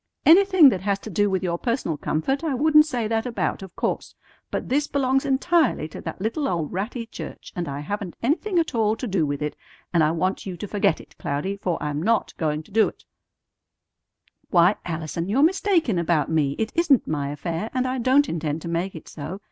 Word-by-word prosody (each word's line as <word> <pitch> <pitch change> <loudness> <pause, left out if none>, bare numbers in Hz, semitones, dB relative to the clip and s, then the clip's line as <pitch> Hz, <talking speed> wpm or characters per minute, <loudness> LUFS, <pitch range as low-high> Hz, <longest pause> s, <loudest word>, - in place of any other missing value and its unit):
Anything 370 -2 +7
that 190 -8 -2
has 200 0 0
to 215 +2 -9
do 205 +3 +2
with 190 -1 -1
your 170 -1 -1
personal 235 - -1
comfort 215 - -1
I 305 -5 0
wouldn't 305 +3 +5
say 245 -7 -1
that 225 +2 -1
about, 235 - -2
of 190 -2 -10
course; - - -3 0.3
but - - -3
this 290 +3 +1
belongs 270 -1 +1
entirely 290 - +2
to - - -9
that 160 - -6
little 230 +9 -1
old 170 -4 -2
ratty 225 +6 -3
church, 225 - -9
and 175 -2 -3
I 140 +1 -4
haven't 200 +3 -4
anything 350 - 0
at 330 -1 +1
all 220 -2 +2
to 240 - -5
do 185 -8 0
with 145 +1 -3
it; 150 - -3 0.4
and 170 -2 +4
I 150 - +3
want 180 +4 -1
you 180 -2 -5
to 205 - -6
forget 200 -5 +1
it, - - -15
Cloudy, 145 +8 -2
for 185 -4 -2
I'm 150 0 -2
not 225 +5 +1
going 155 -1 -1
to 205 - -21
do 220 +2 +4
it!" - - -11 1.4
"Why, 175 +2 +5
Allison, 165 +1 -4
you're 260 +7 +3
mistaken 335 - +2
about 165 -3 +1
me. 150 -4 +2
It 220 0 -1
isn't 330 -7 +3
my 145 -2 -2
affair, 165 +7 -4
and 255 0 0
I 255 0 -2
don't 265 +4 +4
intend 155 -1 -3
to - - -5
make 170 +3 -2
it 160 - -10
so. 160 +6 -7
200 Hz, 210 wpm, -24 LUFS, 165-260 Hz, 1.4 s, Anything